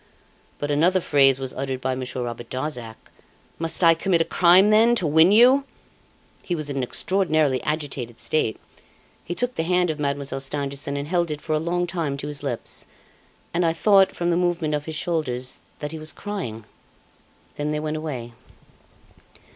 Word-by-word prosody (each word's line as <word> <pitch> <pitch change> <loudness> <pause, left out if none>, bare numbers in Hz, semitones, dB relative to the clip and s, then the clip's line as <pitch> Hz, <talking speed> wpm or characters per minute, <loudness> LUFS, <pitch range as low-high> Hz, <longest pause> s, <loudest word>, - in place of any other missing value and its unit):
But 145 0 -3
another 170 +6 +3
phrase 135 -5 +4
was 130 -1 -4
uttered 135 -1 -3
by 130 0 -1
Monsieur 130 -1 -4
Robert 120 -1 -6
Darzac: 125 -5 -4 0.6
'Must 165 +2 -1
I 165 0 +7
commit 170 +1 +1
a - - +2
crime, 185 +4 +5
then, 225 +3 +5
to 185 - 0
win 160 +4 +5
you?' 250 +6 +6 0.8
He 175 - -3
was 155 -3 -2
in 140 - -4
an - - 0
extraordinarily 155 -1 +1
agitated 140 -6 -4
state. 150 -8 0 0.6
He 175 - -5
took 245 +4 -1
the - - -2
hand 180 0 +1
of 155 - -7
Mademoiselle 140 -2 -2
Stangerson 140 0 -3
and 140 +1 -4
held 175 0 0
it 150 -1 -4
for 155 - -3
a 155 - +2
long 175 +2 -1
time 165 -6 -3
to 140 - -6
his 145 -1 -5
lips, 130 -5 -4 0.7
and 175 +1 +1
I 165 -1 +2
thought, 195 +2 +4
from 175 0 0
the 170 - +2
movement 175 -3 0
of 150 0 -2
his 160 - -5
shoulders, 140 -7 -1 0.2
that 150 0 -5
he 160 - -6
was 155 0 -2
crying. 175 - -6 0.9
Then 145 +1 -2
they 150 - -1
went 155 0 -3
away. 130 -7 -5
155 Hz, 180 wpm, -23 LUFS, 135-175 Hz, 0.9 s, I